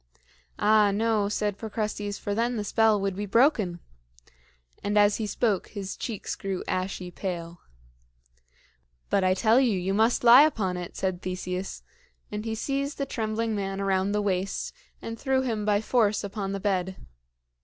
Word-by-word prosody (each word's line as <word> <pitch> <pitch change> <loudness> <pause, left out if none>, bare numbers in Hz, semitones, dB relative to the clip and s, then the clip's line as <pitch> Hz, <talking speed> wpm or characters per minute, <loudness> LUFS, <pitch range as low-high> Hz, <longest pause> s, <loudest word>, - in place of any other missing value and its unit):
"Ah, 210 -1 +4
no," 210 0 +1
said 205 -1 -1
Procrustes, 210 -2 -3
"for 205 - -3
then 235 +3 0
the 210 - -2
spell 220 0 +3
would 195 -1 -1
be 205 +1 -4
broken," 215 - +3 1.0
and 205 +1 0
as 205 0 +5
he 220 - -2
spoke 205 -2 0
his 195 -2 -6
cheeks 220 -5 -4
grew 195 -2 -4
ashy 185 -1 -3
pale. 175 -2 -5 1.5
"But 195 - +3
I 185 0 +3
tell 225 +4 +4
you, 240 -7 +2
you 190 +2 -1
must 225 +4 +2
lie 240 +3 +9
upon 215 -12 +2
it," 180 -1 -7
said 185 -2 -2
Theseus; 185 0 -4 0.5
and 210 +1 -4
he 225 -1 -2
seized 275 +4 -2
the 275 - -1
trembling 225 -2 -2
man 195 -1 -3
around 195 0 +1
the 210 0 0
waist 190 -1 -2 0.3
and 225 0 -6
threw 265 -1 +1
him 220 -5 -2
by 205 -1 +2
force 220 -3 +2
upon 200 -1 -4
the 195 - -3
bed. 190 -2 -1
205 Hz, 165 wpm, -27 LUFS, 195-225 Hz, 1.5 s, lie